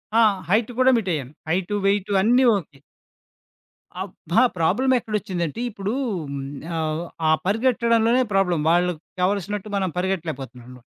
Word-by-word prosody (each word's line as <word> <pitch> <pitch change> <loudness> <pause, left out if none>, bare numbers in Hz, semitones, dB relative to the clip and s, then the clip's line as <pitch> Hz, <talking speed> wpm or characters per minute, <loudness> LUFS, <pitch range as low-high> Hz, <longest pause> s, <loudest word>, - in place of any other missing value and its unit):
ఆ! 230 - +6 0.3
హైట్ 220 +4 +2
కూడా 260 0 +6
మీటయ్యాను. 155 - -2 0.2
Height 185 +4 0
weight 200 0 +1
అన్నీ 245 +5 +4
ఓకే. 150 -6 -9 1.2
అబ్బా! 190 +2 0 0.2
ప్రాబ్లమ్ 245 +11 +2
ఎక్కడొచ్చిందంటే, 205 -4 -3
ఇప్పుడు 200 +1 -4 0.8
ఆహ్, 160 +1 -2 0.3
ఆ - - +5
పరిగెట్టడంలోనే 230 +2 +2
ప్రాబ్లమ్. 180 -5 +2
వాళ్ళక్కావాల్సినట్టు 185 +4 -1
మనం 190 -2 0
పరిగెట్టలేకపోతున్నాను. 135 -9 -4
195 Hz, 105 wpm, -23 LUFS, 170-220 Hz, 1.2 s, ఆ